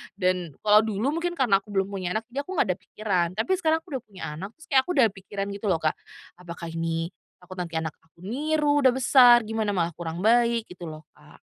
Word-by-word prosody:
Dan 180 -5 -1
kalau 210 0 +6
dulu 225 +9 -1
mungkin 350 0 -2
karena 220 -9 +3
aku 210 - -21
belum 195 0 0
punya 185 -2 -3
anak, 220 - -1
di 270 - -10
aku 365 +7 -5
nggak 230 - +2
ada 180 - -3
pikiran, 185 -3 -1
tapi 220 - -1
sekarang 320 -2 +1
aku 365 - -19
udah - - -25
punya 195 -3 -14 0.2
anak, 195 +6 -7
terus 320 - -16
kayak 265 -1 +6
aku - - -1
udah 255 -5 +6
pikiran 195 0 -6
gitu 200 +2 -7
loh 170 -4 +2
Kak, 155 - +1 0.4
"Apakah 170 -1 -8
ini, 165 0 -2 0.3
takut 185 +1 -10
nanti 170 -2 -5
anak 160 -1 -1
aku 165 +2 -22
niru, 290 +6 +1
udah 260 -2 +4
besar, 245 -2 +6
gimana 220 -1 -2
malah 170 -1 0
kurang 170 +2 -5
baik." 235 0 +3
Gitu 175 -1 -9
loh 155 0 -10
Kak. - - -19
200 Hz, 230 wpm, -26 LUFS, 175-245 Hz, 0.4 s, kalau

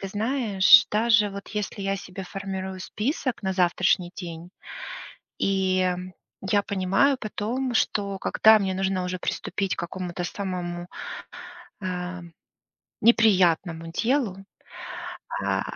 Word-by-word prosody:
ты 195 - -4
знаешь, 220 +2 +5
даже 220 -1 +3
вот 200 0 -8
если 210 -1 -4
я 195 0 0
себе 185 0 -8
формирую 190 0 -5
список 250 - -2
на 190 -1 0
завтрашний 180 0 +2
день, 170 -1 -8 0.9
и 190 -1 +2 0.5
я 200 +1 +1
понимаю 200 +8 +2
потом, 240 +4 -3
что 200 -3 0
когда 220 +3 +5
мне 190 -2 -1
нужно 190 -1 0
уже 180 0 -3
приступить 195 +1 -2
к - - -4
какому-то 175 0 -4
самому, 175 -2 -4 0.9
эм, 180 -2 -5 0.7
неприятному 180 -7 +4
делу, 230 0 0 1.1
а, - - +1
195 Hz, 110 wpm, -25 LUFS, 180-210 Hz, 1.1 s, знаешь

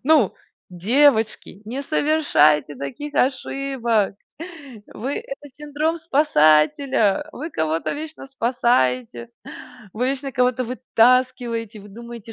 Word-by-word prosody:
Ну, 290 -8 +3 0.4
девочки, 220 +1 +1
не 250 +6 -5
совершайте 280 - +2
таких 285 - -7
ошибок 255 -5 0 0.7
вы 260 +6 -5
Это 470 - -9
синдром 300 +3 -2
спасателя. 275 - +2
Вы 320 +3 -7
кого-то 160 - -2
вечно 310 -1 -8
спасаете, 130 - 0 0.6
вы 250 +4 -1
вечно 275 0 -3
кого-то 250 0 +1
вытаскиваете, 240 -2 +1
вы 205 - -14
думаете, 235 +1 -10
250 Hz, 95 wpm, -21 LUFS, 210-285 Hz, 0.7 s, Ну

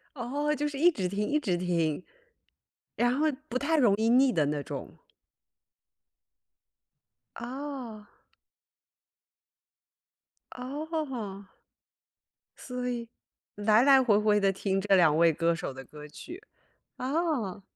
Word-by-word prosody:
哦， 285 +5 -1
就 295 0 -2
是 280 -2 -6
一 350 +4 +6
直 190 - -3
听 205 +2 -2
一 300 - +2
直 185 -11 -1
听。 170 -2 -1 0.9
然 245 +2 +2
后 310 - +2 0.2
不 255 +1 -1
太 315 +4 +1
容 225 -7 +4
易 220 +1 +1
腻 255 +1 +5
的 155 -5 +2
那 145 -1 -2
种。 - - -7 2.4
哦。 245 -4 -7 2.5
哦。 255 - -5 1.1
所 250 -1 -5
以， 235 -2 -4 0.5
来 215 +2 +3
来 270 -2 +7
回 210 -4 +4
回 210 -1 +3
地 195 0 +3
听 195 0 -1
这 195 -1 +3
2 155 -4 +4
位 165 0 +5
歌 170 +2 +1
手 160 - -5
的 135 0 -10
歌 150 +3 -12
曲， 345 - -10 0.6
哦。 255 - -2
230 Hz, 125 characters per minute, -28 LUFS, 190-275 Hz, 2.5 s, 来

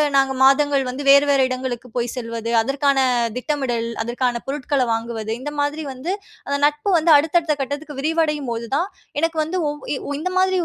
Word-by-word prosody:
நாங்க 270 -1 +3
மாதங்கள் 275 0 +4
வந்து 270 +3 -5
வேறு 280 +1 +7
வேறு 270 -2 +4
இடங்களுக்கு 255 -1 -4
போய் 240 0 0
செல்வது, 230 -1 -4
அதற்கான 275 +3 +1 0.4
திட்டமிடல், 250 -4 -1 0.2
அதற்கான 240 0 -1
பொருட்கள 275 0 -1
வாங்குவது 225 -1 -4
இந்த 295 +2 -4
மாத்ரி 295 +2 -1
வந்து 280 +8 -4 0.4
அந்த 280 0 0
நட்பு 295 +6 0
வந்து 325 0 +3
அடுத்தடுத்த 320 +1 +2
கட்டத்துக்கு 285 +2 -5
விரிவடையும் 300 -3 0
போது, 230 0 -3
தான் 350 +6 +1 0.3
எனக்கு 330 +1 0
வந்து, 345 +4 -3
ஒ - - 0 0.2
இ - - -2 0.2
இந்த 365 +4 -2
மாதிரி 375 0 +2
280 Hz, 170 wpm, -21 LUFS, 250-300 Hz, 0.4 s, வேறு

